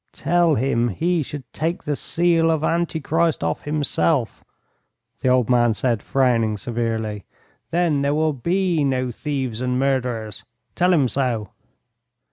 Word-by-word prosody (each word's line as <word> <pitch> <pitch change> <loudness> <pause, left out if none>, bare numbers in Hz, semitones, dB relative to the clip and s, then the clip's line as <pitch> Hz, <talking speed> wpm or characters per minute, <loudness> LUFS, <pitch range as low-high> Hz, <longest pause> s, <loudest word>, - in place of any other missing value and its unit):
"Tell 170 -2 +2
him 120 -2 +1
he 170 - 0
should 145 -1 -6
take 165 +4 -2
the 150 - -1
seal 165 +1 +2
of 160 -2 +1
Antichrist 165 - 0
off 80 -1 -1
himself," 145 -3 0 0.8
the - - 0
old 125 -2 +3
man 120 -3 +3
said, 115 -4 0
frowning 115 -5 +1
severely; 110 -2 -3 0.5
"then 165 -4 +1
there 140 +1 +1
will 155 0 +1
be 170 +3 0
no 130 -2 0
thieves 130 -3 -3
and 125 0 0
murderers. 125 -6 -1 0.3
Tell 180 +1 +2
him 150 -7 +3
so." 120 -6 -1
135 Hz, 135 wpm, -22 LUFS, 120-160 Hz, 0.8 s, old